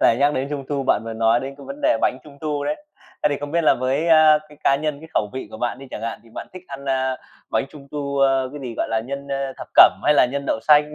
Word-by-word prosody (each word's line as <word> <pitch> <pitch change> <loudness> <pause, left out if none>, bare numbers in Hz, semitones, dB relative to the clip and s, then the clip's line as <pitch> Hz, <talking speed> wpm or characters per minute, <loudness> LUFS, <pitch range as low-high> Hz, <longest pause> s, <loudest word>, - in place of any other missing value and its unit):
Lại 115 - +5
nhắc 145 +3 +3
đến 135 +1 -2
Trung 140 -2 -4
thu 140 -2 -1
bạn - - +3
vừa 115 - -5
nói 115 +1 +2
đến 135 +1 -6
cái 140 - -11
vấn 140 +2 -8
đề - - +3
bánh 130 - +1
Trung 140 -2 -15
thu 150 -2 -2
đấy. 150 - -3 0.4
Ấy, 150 - +2
thì 145 - 0
không 145 - -5
biết 170 0 +1
là - - +6
với, 135 +6 0
a, 155 -1 +7
cái 150 -1 -17
cá 140 - +4
nhân, 150 0 -3
cái 160 - -12
khẩu 105 -1 +1
vị 130 - -6
của - - -8
bạn 120 +1 -2
đi 135 - -10
chẳng 110 - -6
hạn 115 - -4
thì 115 - -20
bạn - - -6
thích 185 -1 -10
ăn, 140 0 -8
à, 130 -1 0 0.3
bánh - - +1
Trung 140 -3 -13
thu, 140 -1 -3
à, 135 0 +5 0.2
cái 145 - -7
gì? 125 -4 -6
Gọi - - -1
là 110 0 0
nhân, 140 +4 -6
à, 135 -1 -2
thập - - -9
cẩm 95 - +8
hay 150 - +5
là 125 - +5
nhân 140 0 -3
đậu 110 - 0
xanh? 150 +2 +4
140 Hz, 305 wpm, -22 LUFS, 130-150 Hz, 0.4 s, cẩm